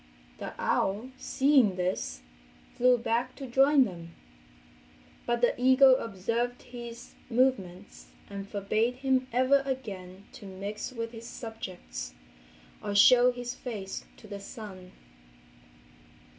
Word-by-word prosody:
The - - -6
owl, 215 +7 0
seeing 265 -7 +3
this, 180 - -2 0.5
flew 250 0 +5
back 235 +2 -1
to 275 - -7
join 270 +3 +5
them. 170 -4 -9 1.1
But 240 0 0
the 240 - +4
eagle 260 +1 +7
observed 230 +3 -2
his 240 -1 -9 0.2
movements, 210 -7 0 0.2
and 200 0 -7
forbade 215 +4 0
him 260 0 +1
ever 260 +3 +4
again 200 -9 -5
to 200 - -11
mix 200 +5 -5
with 230 -2 -5
his 230 0 -9
subjects 185 - -7 0.7
or 205 - -3
show 245 +4 +7
his 245 0 -5
face 210 -7 -6
to - - -15
the 200 -1 -7
sun. 195 -3 -10
230 Hz, 115 wpm, -29 LUFS, 200-255 Hz, 1.1 s, eagle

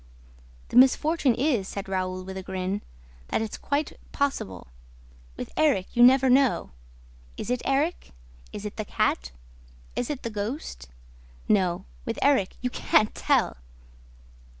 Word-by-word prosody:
"The - - 0
misfortune 265 +1 +5
is," 245 -7 +1
said 200 -1 -5
Raoul, 185 -1 -2
with 190 +1 -7
a 190 - -4
grin, 190 +2 -3 0.5
"that - - 0
it's 220 -1 -3
quite 285 +1 -2
possible. 95 - -2 0.7
With - - -6
Erik, 275 -13 +1
you 240 - +3
never 260 +2 +7
know. 260 0 +3 0.7
Is - - -4
it 250 - 0
Erik? 290 +6 0 0.4
Is 205 - -7
it 210 - -6
the 215 - -3
cat? - - 0 0.6
Is 245 - -2
it 290 -3 -4
the 230 - -3
ghost? 205 - -5 0.6
No, 185 -4 +2 0.2
with - - -4
Erik, 270 -10 +3
you 250 0 -1
can't 215 -3 +2
tell!" - - +1
225 Hz, 140 wpm, -26 LUFS, 190-270 Hz, 0.7 s, never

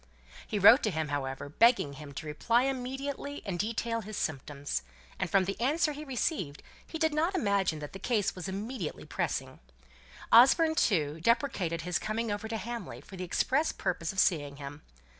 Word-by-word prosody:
He 215 - -2
wrote 205 +7 +8
to 215 - +1
him, 160 -5 -2
however, 140 -1 -3
begging 195 - +3
him 145 0 -10
to 155 - -6
reply 230 +11 +1
immediately 270 +2 -3
and 185 -4 -3
detail 230 +2 -1
his 215 0 -7
symptoms; 140 - -3 0.4
and 190 - -1
from 195 -2 +3
the 195 +4 -4
answer 300 +5 +2
he 295 +1 -7
received 250 - -2 0.2
he 325 - -5
did 320 -1 +1
not 330 +5 +1
imagine 200 - +1
that 150 -1 -8
the 195 - -7
case 210 -1 0
was 185 0 -6
immediately 200 -1 -5
pressing. - - -3 0.7
Osborne, 295 +7 +7
too, 160 - +1
deprecated 190 - +1
his 180 +1 -1
coming 220 +1 -2
over 205 +2 -3
to 225 0 -3
Hamley 235 -2 -6
for 195 - -12
the 185 - -5
express 265 - +1
purpose 170 -2 -2
of 195 - -12
seeing 145 -7 +2
him. 145 +1 -8
205 Hz, 180 wpm, -30 LUFS, 160-250 Hz, 0.7 s, wrote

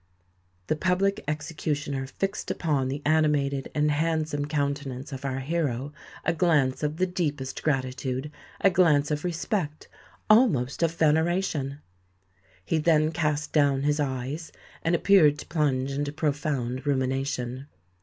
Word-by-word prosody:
The 155 - 0
Public 185 +4 +1
Executioner 150 -3 -3
fixed 195 +8 -3
upon 145 -6 0
the 140 +2 -4
animated 145 -3 +2
and 150 0 +2
handsome 155 -1 0
countenance 140 -2 -2
of 135 0 -6
our 135 0 -2
hero 145 -2 -2 0.3
a 170 - +2
glance 155 -6 +2
of 150 +1 -1
the 185 - +2
deepest 150 -7 -3
gratitude—a 130 +4 -1
glance 155 -5 +3
of 150 0 -1
respect, 170 -2 -2 0.4
almost 205 - +4
of 165 0 +1
veneration! 160 -3 +1 0.8
He 160 - +1
then 155 -1 +3
cast 150 -2 -1
down 140 -3 +3
his 150 +1 +1
eyes, 140 +3 -3 0.3
and 165 +1 +2
appeared 165 -5 +5
to - - -8
plunge 140 -5 0
into 145 +1 -2
profound 145 -4 -2
rumination. 130 -1 -1
150 Hz, 125 wpm, -26 LUFS, 135-160 Hz, 0.8 s, appeared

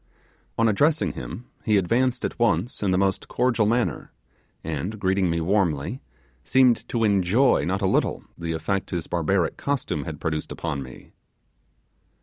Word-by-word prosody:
On 115 - +3
addressing 110 - +2
him, 95 - -7 0.2
he 105 -2 +3
advanced 120 +6 +1
at - - -5
once 110 -1 +1
in 100 - +1
the 90 - +2
most 95 0 0
cordial 120 -3 +1
manner, 120 +2 0 0.5
and 80 +7 -4
greeting 95 -1 +1
me 85 0 0
warmly, 90 - 0 0.4
seemed 120 +4 +3
to 115 -2 0
enjoy 105 +5 +3
not - - -1
a - - +3
little - - +1
the 85 -1 -4
effect 90 +5 -2
his 85 -3 -3
barbaric 85 +1 0
costume 125 - -2
had - - -6
produced 75 -1 -3
upon 70 - -3
me. 65 -1 -11
100 Hz, 150 wpm, -24 LUFS, 85-115 Hz, 0.5 s, On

